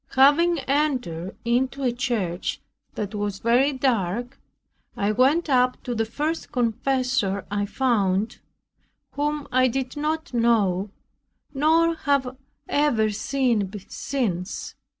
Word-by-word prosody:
Having 295 +5 +5
entered 255 - -1
into 260 +3 0
a 250 - +2
church, 235 -9 -2 0.4
that 205 0 -4
was 205 -1 -2
very 245 +7 +3
dark, 245 -1 -1 0.6
I 200 +1 +1
went 275 +10 +3
up 250 -2 +2
to 245 - -3
the 225 -1 0
first 300 +8 -3
confessor 245 -4 0
I 205 0 -1
found, 210 -3 0 0.7
whom 295 0 -2
I 255 +1 +4
did 260 +2 -3
not 315 +1 -2
know, 215 -5 +2 0.6
nor 325 +4 +3
have 280 -5 0 0.3
ever 240 -8 +2
seen 230 -3 0 0.2
since. 205 -10 -3
250 Hz, 110 wpm, -24 LUFS, 210-280 Hz, 0.7 s, Having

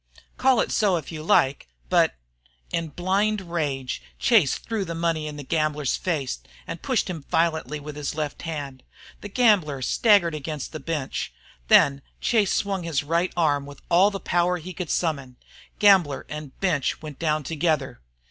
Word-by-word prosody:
Call 260 -2 +3
it - - -2
so 200 -4 +3
if 160 - -7
you 155 -2 -6
like, 135 - +2 0.2
but 60 - +3 0.3
" - - -36
In 165 -1 -1
blind 195 +7 0
rage 140 -6 -2 0.2
Chase 210 - +4
threw 225 -3 -3
the 170 -2 -5
money 165 -2 -1
in 150 - -6
the 145 - -6
gambler's 150 -2 0
face 145 - -2 0.3
and - - -6
pushed - - 0
him 170 -4 -5
violently 160 -3 0
with 150 0 -8
his 150 0 -4
left 150 -2 -3
hand. 145 -5 -5 0.4
The 205 - -7
gambler 190 - +3
staggered 200 - +4
against 150 -1 -5
the 155 - -6
bench. 150 -5 -3 0.4
Then 140 - +5 0.2
Chase 215 -5 +2
swung 195 -2 0
his 165 -5 -1
right 170 +4 0
arm 145 -4 +2
with 145 - -11
all 185 +4 +5
the 200 -1 -5
power 175 0 +1
he 180 +2 -8
could 180 -3 -5
summon. 140 -7 -1 0.4
Gambler 185 -9 +4
and 150 -3 -8
bench 160 -7 0
went 150 -3 -8
down 155 -2 0
together. 155 - -1
160 Hz, 170 wpm, -25 LUFS, 145-180 Hz, 0.4 s, Then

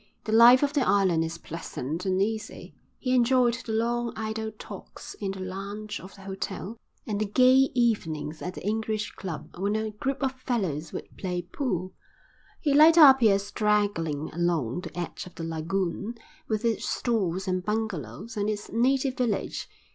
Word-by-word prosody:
The 215 - -4
life 240 +4 +8
of 285 0 +1
the 290 - +2
island 190 -8 +3
is 165 +1 -4
pleasant 165 0 -5
and 185 0 +1
easy. 215 +2 -3 0.2
He 255 -1 -1
enjoyed 250 -1 +4
the 220 - -4
long 235 +1 0
idle 220 0 -3
talks - - -9
in 200 - -4
the 190 0 -5
lounge 200 +3 -5
of 190 - -12
the 195 - -14
hotel 195 +2 -5 0.3
and 210 -1 -2
the - - +2
gay 255 +4 +5
evenings 160 -11 0
at 180 - -5
the - - -8
English 215 0 -1
Club 170 -6 -7
when 200 +2 0
a 220 0 -1
group 270 +6 -3
of 265 - +2
fellows 195 - -2
would - - -8
play 180 -2 -3
pool. 185 - -3 0.7
He 290 -3 +2
liked 315 +3 +7
Apia 265 -10 +8
straggling 200 -7 0
along 170 -5 0
the 180 - -7
edge 175 +2 -5
of 180 - -14
the 165 - -6
lagoon, 170 +6 -2 0.3
with 215 +1 -1
its 230 -2 0
stores 190 -6 -1
and 185 -1 0
bungalows, 210 - -3
and 205 0 0
its 210 -1 -4
native 260 +3 +1
village. 235 -5 -1
210 Hz, 170 wpm, -27 LUFS, 180-235 Hz, 0.7 s, life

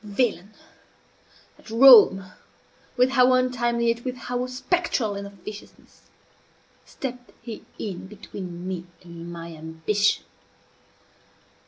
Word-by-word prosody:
Villain! 205 -2 -2 1.0
at - - -16
Rome, 220 -6 +7 0.6
with 250 +1 +4
how 255 -1 +5
untimely, 240 -2 +1
yet 230 +1 -1
with 255 -1 -3
how 250 +1 -3
spectral 255 - -1
an 200 0 -6
officiousness, 200 +1 -13 0.8
stepped 250 -2 -7
he 230 -2 -8
in 190 -3 -6
between 185 -3 -8
me 180 -2 -5 0.2
and 170 0 -10
my 170 0 -8
ambition! 160 +6 -1
215 Hz, 105 wpm, -24 LUFS, 185-250 Hz, 1.0 s, Rome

